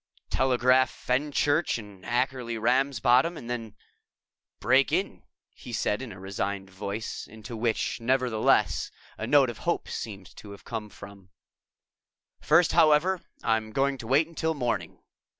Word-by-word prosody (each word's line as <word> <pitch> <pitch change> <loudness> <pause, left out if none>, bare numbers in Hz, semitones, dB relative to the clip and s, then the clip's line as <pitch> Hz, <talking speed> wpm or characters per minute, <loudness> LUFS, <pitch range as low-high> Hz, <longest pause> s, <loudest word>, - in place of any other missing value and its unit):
"Telegraph 130 0 +3
Fenchurch 145 +4 0
and 100 -4 -11
Ackerly 120 -1 -1
Ramsbottom 130 +5 +2
and 120 - -9
then 115 -3 -5 0.8
break 130 +4 +3
in," 185 +5 -1 0.3
he 125 - -11
said 110 0 -1
in 130 -4 -7
a 95 - -10
resigned 95 0 -4
voice, 100 +3 -5
into 110 +2 -9
which, 115 0 -1
nevertheless, 125 -2 +2 0.3
a 110 - -3
note 135 -2 +5
of 115 - -13
hope - - -1
seemed 100 -4 -6
also - - -19
to 105 - -11
have 100 - -14
come. 100 -4 -8 1.1
"First, 175 0 +4
however, 160 +4 +4 0.2
I'm 110 -1 0
going 135 +3 0
to 115 - -8
wait 140 +6 +4
until 160 -1 -2
morning." 115 - -3
120 Hz, 135 wpm, -27 LUFS, 105-135 Hz, 1.1 s, note